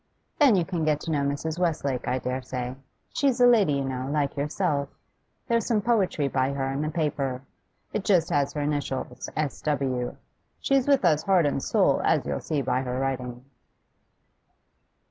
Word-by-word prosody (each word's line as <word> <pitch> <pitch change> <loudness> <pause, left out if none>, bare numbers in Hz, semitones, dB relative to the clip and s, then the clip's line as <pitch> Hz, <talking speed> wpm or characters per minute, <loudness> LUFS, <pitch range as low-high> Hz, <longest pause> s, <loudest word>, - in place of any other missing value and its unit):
'Then 280 -8 +6
you 175 -3 +2
can 170 -3 -2
get 155 -1 +2
to 165 - -4
know 145 -2 +1
Mrs. 145 +4 -2
Westlake, 145 -7 -1
I 125 - +1
dare 130 0 -3
say. 125 0 -4 0.4
She's 270 -3 +1
a 245 - +7
lady, 220 -10 +5
you 140 -1 0
know, 130 0 -3
like 145 -1 0
yourself. 145 -1 -1 0.6
There's 230 -3 +1
some 230 -3 +2
poetry 200 -9 +1
by 135 0 0
her 135 -1 -2
in 135 +2 -2
the 155 - -1
paper; 140 -5 -2 0.5
it 210 - -1
just 175 -6 +2
has 140 0 +1
her 150 - -2
initials, 140 -4 -3
"S. 150 -3 -2
W." 135 -4 -1 0.4
She's 275 -1 +2
with 275 -7 +4
us 155 -3 +4
heart 185 -2 +3
and 140 -1 0
soul, - - +2
as - - +2
you'll 70 -1 -2
see 145 -3 -2
by 130 0 0
her 125 -1 -3
writing. 125 -2 -3
145 Hz, 180 wpm, -26 LUFS, 135-175 Hz, 0.6 s, a